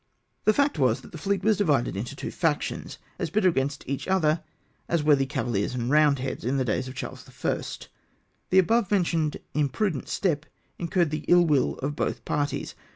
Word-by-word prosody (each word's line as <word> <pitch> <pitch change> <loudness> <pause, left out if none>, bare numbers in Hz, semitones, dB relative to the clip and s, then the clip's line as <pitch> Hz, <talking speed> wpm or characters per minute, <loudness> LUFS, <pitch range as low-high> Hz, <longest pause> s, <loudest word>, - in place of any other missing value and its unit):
The 215 - +5
fact 280 - +1
was, 130 -1 +2
that - - -14
the 165 - -8
fleet 195 +3 -1
was 215 -1 +3
divided 145 - +1
into 105 +5 -4
two - - -5
factions, - - -1 0.2
as - - -1
bitter 190 +2 +3
against 140 -3 -1
each 140 +1 -3
other 165 -4 +2 0.5
as 170 -3 +1
were 150 -1 +6
the 135 -1 0
CavaHers 120 -5 -1
and 120 +1 -1
Eoundlieads 145 -3 +2
in 130 +3 0
the 130 - +1
days 125 +3 -1
of 130 - -8
Charles - - -7 0.2
I. - - +1 0.9
The 185 - +3
above 220 +3 +4
mentioned 165 -6 +1 0.2
imprudent 150 +3 0
step 155 -6 0 0.3
incurred 170 -2 +1
the 155 0 -3
ill 175 0 +6
will 145 -5 +2
of 145 +1 -1
both - - -2
parties. 145 -1 -1
150 Hz, 185 wpm, -26 LUFS, 135-180 Hz, 0.9 s, were